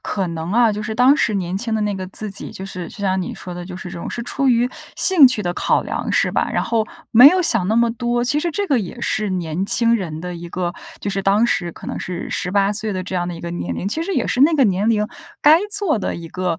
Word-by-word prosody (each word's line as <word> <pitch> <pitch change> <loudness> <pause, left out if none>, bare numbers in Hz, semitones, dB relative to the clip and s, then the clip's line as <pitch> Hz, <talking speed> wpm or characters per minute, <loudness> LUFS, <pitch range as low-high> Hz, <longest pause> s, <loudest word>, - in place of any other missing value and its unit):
可 195 -2 -2
能 165 0 -5
啊， 230 0 +3
就 210 - -4
是 220 +1 -4
当 250 +4 +5
时 230 -8 0
年 185 -1 -2
轻 225 +1 -3
的 215 - 0
那 205 -1 -1
个 185 -1 -5
自 210 +2 -2
己， 195 - -6
就 190 - -8
是 185 -3 -6
就 - - -13
像 190 -1 0
你 180 - -5
说 180 - -8
的， 175 0 -7
就 180 - -8
是 180 -1 -8
这 170 - -7
种 - - -6
是 235 - -4
出 275 +2 -1
于 240 0 +3 0.3
兴 325 -9 +7
趣 220 -4 +1
的 175 - -2
考 - - +1
量， - - -4
是 - - +2
吧？ - - 0
然 - - -1
后， 225 -2 0 0.2
没 245 +5 +9
有 365 +2 +2
想 215 - +3
那 220 - +1
么 235 0 +3
多。 240 0 -1
其 290 +4 +1
实 345 - -1
这 400 +5 -2
个 275 -7 +2
也 195 +5 -7
是 215 -3 -1
年 180 0 -2
轻 230 +1 +3
人 165 -7 -4
的 180 0 -5
一 170 0 -8
个， 175 0 -3 0.3
就 200 - -3
是 195 - -1
当 200 +4 +3
时 175 -7 0
可 - - -12
能 - - -5
是 180 0 -5
18 200 +2 0
岁 215 +1 -2
的 185 -2 -3
这 185 +1 -7
样 175 -1 -1
的 175 - -5
一 165 - -9
个 170 - -5
年 90 - -4
龄， 190 - -4
其 310 +11 -2
实 385 +3 -3
也 - - 0
是 250 - -1
那 315 +4 +5
个 275 - +4
年 200 0 +1
龄 210 -2 +2 0.4
该 305 +2 +7
做 400 - +2
的 - - -3
一 165 -1 -8
个， 180 -3 -2
205 Hz, 305 characters per minute, -20 LUFS, 180-240 Hz, 0.4 s, 没